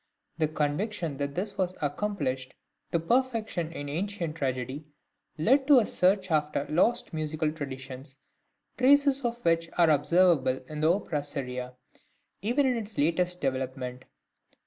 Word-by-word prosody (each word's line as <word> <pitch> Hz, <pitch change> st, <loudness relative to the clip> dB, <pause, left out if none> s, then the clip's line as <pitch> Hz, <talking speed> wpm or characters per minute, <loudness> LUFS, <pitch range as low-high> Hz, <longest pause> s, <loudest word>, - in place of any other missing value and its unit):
The 155 Hz, -, +3 dB
conviction 155 Hz, +2 st, -2 dB
that 140 Hz, 0 st, -3 dB
this 200 Hz, +3 st, -3 dB
was 185 Hz, -1 st, 0 dB
accomplished 145 Hz, -5 st, -2 dB, 0.4 s
to 170 Hz, -, +2 dB
perfection 225 Hz, -4 st, 0 dB
in 145 Hz, -3 st, -6 dB
ancient 170 Hz, +1 st, -3 dB
tragedy 135 Hz, 0 st, -3 dB, 0.5 s
led 265 Hz, -, +3 dB
to 290 Hz, -2 st, +8 dB
a 235 Hz, -, +5 dB
search 185 Hz, 0 st, +2 dB
after 150 Hz, -2 st, +1 dB
lost 220 Hz, +7 st, +2 dB
musical 155 Hz, 0 st, -1 dB
traditions, 135 Hz, -2 st, -8 dB, 0.6 s
traces 280 Hz, +1 st, +4 dB
of 235 Hz, -1 st, -1 dB
which 165 Hz, 0 st, +2 dB
are 170 Hz, -2 st, +5 dB
observable 150 Hz, -3 st, +3 dB
in 155 Hz, -1 st, -6 dB
the 155 Hz, +2 st, +4 dB
opera 175 Hz, -6 st, -1 dB
seria, 125 Hz, -3 st, -5 dB, 0.7 s
even 245 Hz, +8 st, +2 dB
in 255 Hz, -2 st, +2 dB
its 215 Hz, -1 st, -7 dB
latest 175 Hz, +4 st, +1 dB
development. 130 Hz, -1 st, -3 dB
160 Hz, 135 wpm, -28 LUFS, 140-200 Hz, 0.7 s, to